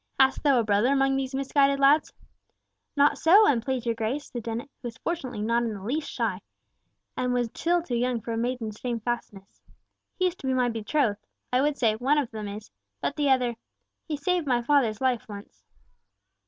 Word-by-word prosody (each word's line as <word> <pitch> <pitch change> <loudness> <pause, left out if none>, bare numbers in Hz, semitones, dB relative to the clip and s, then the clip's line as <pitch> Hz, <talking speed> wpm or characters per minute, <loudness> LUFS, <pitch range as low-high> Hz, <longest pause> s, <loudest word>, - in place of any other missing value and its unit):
Hast 265 0 +4
thou 275 -4 +4
a - - +2
brother 210 +4 +2
among 270 -1 +2
these 265 -1 -2
misguided 275 0 +2
lads?" 285 +2 +4 0.8
"Not 285 0 +3
so, 395 +7 +6
an 250 - +3
please 255 0 -3
your 230 - +1
Grace," 230 +6 -3
said 240 - -4
Dennet, 230 +4 -4
who 240 - -4
fortunately 255 0 -5
was - - -1
not 235 +1 +2
in 230 -3 -2
the 195 - -9
least 290 +8 -2
shy, - - -2 0.7
and 250 0 -1
was 240 -2 0
still 345 0 +1
too 265 - -6
young 245 0 0
for 230 - -6
a 225 - -2
maiden's 230 -3 -3
shamefastness. 235 -4 -5 0.6
"He 370 - +1
is 360 -1 0
to 265 - -6
be 260 - +1
my 250 -1 +2
betrothed. 225 -1 -1 0.3
I 250 - +4
would 290 0 +1
say, 225 -4 +2
one 270 +6 +2
of 280 -5 -1
them 215 -2 -5
is, 210 +2 -8 0.3
but 285 - -2
the 290 -2 +1
other—he 255 +4 -3
saved 345 +2 0
my 245 -2 +1
father's 235 -5 +2
life 255 -4 0
once." 205 0 -11
250 Hz, 195 wpm, -26 LUFS, 230-280 Hz, 0.8 s, so